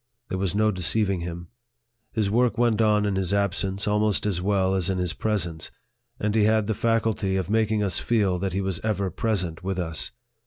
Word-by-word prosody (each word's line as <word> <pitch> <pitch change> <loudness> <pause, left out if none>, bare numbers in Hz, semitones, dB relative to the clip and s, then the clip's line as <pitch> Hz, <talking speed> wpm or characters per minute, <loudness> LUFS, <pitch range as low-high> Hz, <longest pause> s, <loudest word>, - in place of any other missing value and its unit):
There 95 - -2
was 95 0 -1
no 110 +1 +3
deceiving 95 +1 +1
him. 85 0 -6 0.6
His 105 -4 0
work 120 -1 +2
went 115 -2 +2
on 105 -1 +3
in 100 -1 0
his 95 +1 +1
absence 100 0 -1
almost 105 0 +1
as 95 -4 0
well 95 -1 +1
as 95 -1 0
in 95 - 0
his 90 -3 -1
presence; 85 -5 -2 0.5
and 105 0 0
he 105 -1 +3
had 110 0 +3
the 110 - 0
faculty 110 -3 0
of 95 +1 -2
making 110 -1 +2
us 95 -3 0
feel 100 -6 +1
that 95 -1 -2
he 95 - 0
was 95 -3 -2
ever 100 -3 -1
present 90 -7 -2
with 95 0 -2
us. 80 -3 -3
100 Hz, 200 wpm, -25 LUFS, 95-110 Hz, 0.6 s, no